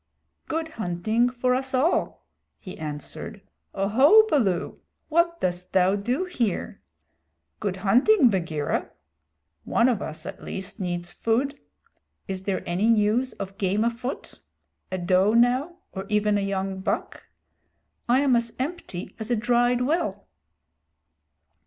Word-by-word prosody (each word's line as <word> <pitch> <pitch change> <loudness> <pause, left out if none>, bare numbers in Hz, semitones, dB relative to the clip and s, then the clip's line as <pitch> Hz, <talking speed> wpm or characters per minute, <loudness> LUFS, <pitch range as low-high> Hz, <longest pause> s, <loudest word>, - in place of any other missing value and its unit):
"Good 320 0 -2
hunting 220 - 0
for 250 0 0
us 265 +1 -1
all," 290 +7 0 0.3
he 185 - -9
answered. 150 -2 -7 0.4
"Oho, 260 - +6
Baloo, 210 - 0 0.3
what 340 +1 +2
dost 180 0 -2
thou 190 +1 +4
do 245 - -1
here? 240 - -2 0.8
Good 200 -3 -2
hunting, 250 - +4
Bagheera. 165 -6 -1 0.7
One 235 - +2
of 235 -6 +1
us 155 +1 -6
at 195 +1 -7
least 195 +3 -6
needs 175 -2 -3
food. 265 +6 0 0.7
Is 190 -2 -3
there 190 0 -2
any 180 +5 +1
news 225 +3 +2
of 195 0 -8
game 200 +2 +1
afoot? 235 +3 -4 0.5
A 185 - -1
doe 185 +3 +3
now, 255 +8 +3 0.2
or 190 0 -6
even 210 0 +2
a 205 - +1
young 195 -1 -2
buck? 190 - -3 0.8
I 255 +3 +5
am 275 -3 +3
as 235 -1 0
empty 260 - -5
as 220 +1 -5
a 240 - +2
dried 245 +2 +2
well." 250 - -1
215 Hz, 130 wpm, -25 LUFS, 190-255 Hz, 0.8 s, Oho